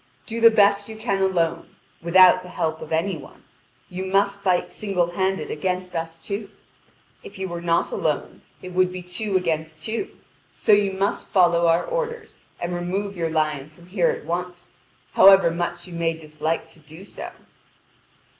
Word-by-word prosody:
Do 230 +1 -4
the 230 - +9
best 205 -1 +3
you 220 - -7
can 215 -3 -1
alone, 175 -4 0 0.3
without 185 +2 +6
the 180 - -11
help 160 -3 -2
of 155 - -9
any 170 +4 0
one. 135 - -14 0.4
You 185 +1 -5
must 200 +1 +1
fight 185 -2 +1
single 180 -5 -1
handed 190 +2 -1
against 180 +3 -3
us 165 0 -4
two. 205 +1 -5 0.7
If 200 - -11
you 190 0 -3
were 170 -1 -5
not 170 0 +1
alone, 150 -2 -2 0.2
it 185 - -7
would 185 0 +2
be 180 0 -7
two 190 +3 -1
against 160 -3 -3
two; 230 - -4 0.4
so - - +1
you 205 -1 +4
must 195 +1 -2
follow 170 -2 +4
our 165 +1 +3
orders, 470 -2 -4 0.2
and 175 +1 -3
remove 190 +3 -3
your 165 -2 -1
lion 155 -3 -1
from 170 +3 -19
here 180 -1 +1
at - - -4
once, 175 +1 -5 0.4
however 195 -3 +7
much 170 +1 -3
you 180 - -11
may 165 -1 0
dislike 155 0 -3
to - - -17
do 160 +4 -14
so." - - -8
180 Hz, 175 wpm, -23 LUFS, 165-195 Hz, 0.7 s, the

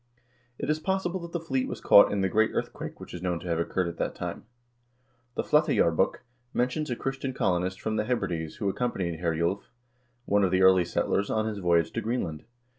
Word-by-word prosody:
It - - -4
is 155 +1 +1
possible 190 +1 -1
that 170 -1 -8
the 170 - -2
fleet 135 -5 -1
was - - -5
caught 100 - +7
in 100 - 0
the 95 - +2
great 110 +4 +3
earthquake - - -4
which - - -10
is 90 - -6
known 90 -2 -1
to - - -8
have 85 -1 0
occurred 90 +1 0
at 85 - -6
that - - -2
time. - - -5 0.9
The - - -1
"Flateyjarbok" 95 - +2 0.3
men 125 +1 +2
tions 150 +3 -3
a 120 - -1
Christian 135 +1 -3
colonist 90 -2 0
from 110 0 -2
the 105 - 0
Hebrides 85 -10 -2
who 105 - -3
accompanied 95 -6 -2
Herjulv, 85 +3 0 0.6
one 100 0 +3
of 95 - +3
the 95 +1 +2
early 95 -1 +6
settlers, 100 +3 0
on 110 0 0
his 110 -2 -3
voyage 85 -3 +2
to - - -2
Greenland. 95 -10 -3
100 Hz, 205 wpm, -28 LUFS, 85-125 Hz, 0.9 s, caught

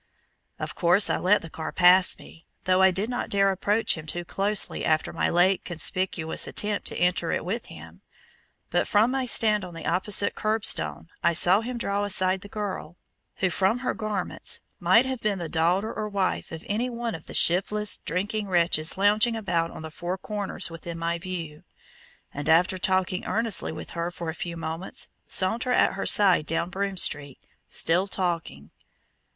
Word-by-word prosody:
Of - - -5
course 180 +3 +4
I - - +1
let 205 +3 +2
the 165 - -8
car 160 0 -5
pass 180 +1 +5
me, 165 - -15 0.2
though 185 0 +2
I 190 - +7
did 190 +4 0
not 245 0 -3
dare 195 -1 +3
approach 205 +4 +1
him 155 -1 -9
too 175 +2 -3
closely 200 +3 -1
after 155 0 0
my - - 0
late 180 +2 +3
conspicuous 175 -1 -1
attempt 210 0 -1
to - - -3
enter 175 -2 +1
it - - -2
with 220 +6 -4
him. - - -13 0.7
But - - +1
from 215 +4 +3
my 265 -1 -1
stand 215 -3 +2
on 175 -2 -9
the 165 - -8
opposite 200 +2 +3
curb 215 0 -1
stone 75 +1 +2
I 170 - +2
saw 180 +5 +5
him 245 +1 -5
draw 200 -3 -1
aside 190 -2 +1
the 205 - -10
girl, 195 -6 -5 0.4
who 190 -1 0
from 195 +6 +1
her - - +1
garments 215 -4 -3 0.2
might 185 +8 +4
have 260 -2 -4
been 210 -2 0
the 170 -2 -5
daughter 175 +7 0
or 215 -1 -4
wife 195 -2 -2
of 160 0 -8
any 230 +5 -1
one 235 -1 -4
of 165 - -9
the - - -5
shiftless, 205 +4 +3
drinking 205 +5 -3
wretches 170 -3 +1
lounging 210 +4 +3
about 170 -6 -1
on 160 - -10
the 160 - -7
four 175 +3 -4
corners 200 -3 -4
within 165 0 -7
my 170 +1 -2
view, 165 -4 -6 0.7
and 145 +2 -4
after 180 +3 +3
talking 185 0 0
earnestly 225 -3 -2
with - - -8
her 170 0 -3
for 175 -2 -6
a - - -9
few 170 +1 -6
moments, 165 +3 -5 0.2
saunter 225 +7 +1
at - - +3
her 195 - -4
side 185 -7 +4
down 170 +2 -1
Broome 195 +1 -3
Street, 145 -5 +1 0.3
still 180 +4 +1
talking. 170 - -3
185 Hz, 185 wpm, -26 LUFS, 170-210 Hz, 0.7 s, I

